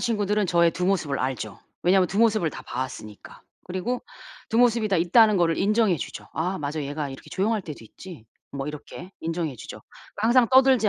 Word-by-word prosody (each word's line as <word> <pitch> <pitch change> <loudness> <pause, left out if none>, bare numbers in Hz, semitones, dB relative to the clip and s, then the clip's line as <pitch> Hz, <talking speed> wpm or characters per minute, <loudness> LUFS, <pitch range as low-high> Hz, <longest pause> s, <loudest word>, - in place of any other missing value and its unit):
친구들은 210 -3 0
저의 170 -1 +3
두 180 +2 -2
모습을 160 -8 0
알죠. 125 -6 -3 0.2
왜냐면 185 0 +4
두 195 - -3
모습을 215 -7 +3
다 - - -9
봐왔으니까. 120 -4 -7 0.2
그리고 185 +8 -3 0.5
두 225 - -1
모습이 235 -2 +3
다 195 - +2
있다는 210 +5 +5
거를 165 -3 +2
인정해 210 -2 +2
주죠. - - -7
'아 180 +4 -2
맞아. 150 +1 -3
얘가 145 0 -4
이렇게 135 - -11
조용할 210 +3 0
때도 150 -9 -9
있지.' 155 - -12 0.3
뭐 140 0 -5
이렇게 150 +5 -8
인정해 165 -5 -3
주죠. - - -9 0.3
그 210 - -4
항상 240 0 +5
떠들지 260 -4 +5
180 Hz, 405 characters per minute, -25 LUFS, 150-215 Hz, 0.5 s, 있다는